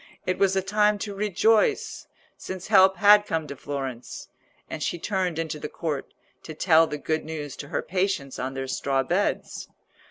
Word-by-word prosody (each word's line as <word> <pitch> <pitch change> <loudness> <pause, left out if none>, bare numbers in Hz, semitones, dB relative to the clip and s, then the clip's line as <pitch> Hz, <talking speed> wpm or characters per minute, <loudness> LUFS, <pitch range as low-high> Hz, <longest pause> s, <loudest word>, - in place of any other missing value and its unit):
It 185 - -1
was 195 -1 +3
a 190 - +1
time 210 +2 +2
to 205 0 -5
rejoice, 210 - +1 0.3
since 185 0 -7
help 190 -2 +6
had 205 0 +6
come 160 -1 -1
to 140 -1 -7
Florence; 135 -3 -6 0.4
and 155 - -6
she 175 - -1
turned 185 -2 -2
into 160 -2 -3
the 150 - -5
court 150 -5 -4 0.3
to 155 - -9
tell 165 -1 +4
the 150 - -4
good 155 +2 -2
news 150 -3 -6
to 140 - -7
her - - -2
patients 180 -7 -2
on 130 +1 -4
their 135 0 -3
straw 135 0 0
beds. 180 +9 -1
165 Hz, 180 wpm, -25 LUFS, 145-195 Hz, 0.4 s, help